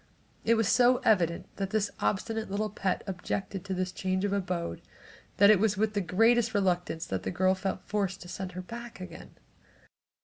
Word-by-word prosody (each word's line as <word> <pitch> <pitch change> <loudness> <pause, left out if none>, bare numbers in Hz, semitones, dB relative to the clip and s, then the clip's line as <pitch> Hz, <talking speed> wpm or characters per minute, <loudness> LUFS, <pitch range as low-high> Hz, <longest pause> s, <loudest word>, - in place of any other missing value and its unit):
It 230 - +4
was 225 -2 +2
so 250 +2 +5
evident 175 -6 +2
that 195 -1 -2
this 210 0 0
obstinate 220 +2 -1
little 210 +2 -1
pet 190 -2 -1
objected 195 0 -4
to 190 -1 -2
this 185 0 -1
change 185 +1 -1
of 200 - 0
abode 180 - -2 0.6
that 200 +1 +8
it 210 - +5
was 210 -1 +2
with 215 +1 +1
the 205 - 0
greatest 225 +5 +3
reluctance 180 -4 0
that - - -3
the - - -3
girl 185 +1 +2
felt 190 0 -3
forced 200 -2 -2
to - - -11
send 185 0 -6
her 185 +1 -6
back 235 +2 -8
again. 185 - -10
195 Hz, 190 wpm, -29 LUFS, 185-215 Hz, 0.6 s, that